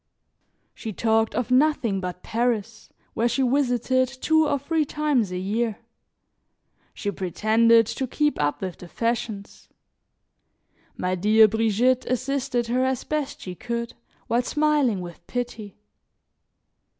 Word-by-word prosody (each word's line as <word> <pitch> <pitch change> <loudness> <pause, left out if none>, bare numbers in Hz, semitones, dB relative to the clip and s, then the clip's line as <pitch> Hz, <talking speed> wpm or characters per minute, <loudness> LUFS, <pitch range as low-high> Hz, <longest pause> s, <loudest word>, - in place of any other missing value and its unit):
She 220 -3 -6
talked 225 +2 +1
of 245 0 -2
nothing 255 -7 +2
but 180 -1 -6
Paris, 225 -2 -2 0.2
where 230 - +1
she 270 - 0
visited 255 -1 +1
two 310 +4 +1
or 285 - +1
three 310 +3 0
times 290 -8 0
a 180 - -3
year; 215 +4 -1 1.1
she 205 - -4
pretended 220 +5 +3
to 265 +5 -3
keep 295 - 0
up 145 0 -1
with 185 -2 -5
the 180 - -10
fashions; 230 -1 -4 1.3
my 180 0 -1
dear 215 +4 +5
Brigitte 225 +4 +1
assisted 255 -1 -1
her 250 +2 0
as 260 -1 -1
best 300 -2 -3
she 185 - -6
could, 235 +4 -4 0.3
while 235 +1 +1
smiling 290 -6 +1
with 175 -1 -9
pity. 235 -5 -5
235 Hz, 125 wpm, -24 LUFS, 210-260 Hz, 1.3 s, dear